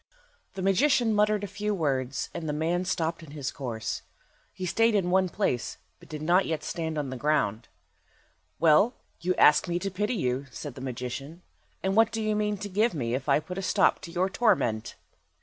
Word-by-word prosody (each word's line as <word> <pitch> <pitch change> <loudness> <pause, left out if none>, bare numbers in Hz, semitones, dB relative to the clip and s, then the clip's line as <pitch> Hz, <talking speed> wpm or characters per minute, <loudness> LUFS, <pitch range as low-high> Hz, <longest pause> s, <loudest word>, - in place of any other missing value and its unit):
The 190 - -4
magician 235 +4 +3
muttered 210 0 +2
a - - -2
few 205 +1 -2
words, 135 -6 -1
and 160 -2 -4
the - - 0
man 170 +4 0
stopped 165 -2 -1
in 155 -3 -12
his 135 -2 -3
course. 115 -5 -4 0.5
He 185 - -6
stayed 225 +5 +3
in 180 -3 +1
one 185 0 +3
place, 150 - -1 0.2
but 175 - -17
did 155 -1 -6
not 175 +4 +3
yet 160 -2 -2
stand 160 -2 -3
on 140 -3 -2
the 130 - -4
ground. 120 -6 0 0.9
"Well, 170 +10 +5 0.2
you 180 +1 0
ask 150 +5 +5
me 175 0 0
to 195 +2 -3
pity 210 +6 -1
you," 130 - -1
said 140 +3 -7
the 130 - -10
magician. 130 +6 -6 0.4
"And 190 0 0
what 225 0 +5
do 225 - -3
you 215 -1 0
mean 210 0 0
to 205 - -5
give 210 +2 +1
me 120 -5 -2
if 135 +3 -2
I 140 - +5
put 180 +4 -6
a - - -2
stop 195 0 +3
to 170 - -8
your 180 +2 +1
torment?" 180 - +1
175 Hz, 200 wpm, -27 LUFS, 140-200 Hz, 0.9 s, Well